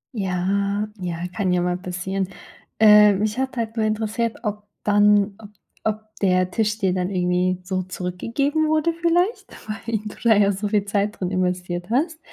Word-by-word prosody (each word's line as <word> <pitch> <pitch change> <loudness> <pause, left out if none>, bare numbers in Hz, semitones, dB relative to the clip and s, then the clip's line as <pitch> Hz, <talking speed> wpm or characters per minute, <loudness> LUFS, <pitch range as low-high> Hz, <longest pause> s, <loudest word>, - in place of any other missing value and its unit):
Ja 200 +1 0
ja, 175 -2 -3 0.2
kann 195 -4 0
ja 180 -1 +2
mal 180 0 0
passieren. 185 +1 -3 0.5
Äh, 210 -1 +8
mich 215 +4 -1
hat 265 -1 -2
halt 225 -1 -3
nur 220 -2 +1
interessiert, 220 +1 -1
ob 210 -1 -4 0.2
dann 205 -1 +4
ob 210 -2 -11 0.4
ob 215 0 -3
der 185 -1 +2
Tisch 215 +1 0
dir 190 -4 +1
dann 180 0 -1
irgendwie 180 0 0
so 185 0 -2
zurückgegeben 230 - -1
wurde, 315 +2 +2
vielleicht? 350 +6 +1 0.2
Weil 220 +1 -3
du 210 - -7
da 225 -2 +5
ja 200 -1 +4
so 205 +2 -3
viel 205 -1 +1
Zeit 205 +1 -1
drin 180 - -1
investiert 180 -1 -2
hast. 315 +7 0
205 Hz, 170 wpm, -22 LUFS, 185-220 Hz, 0.5 s, Äh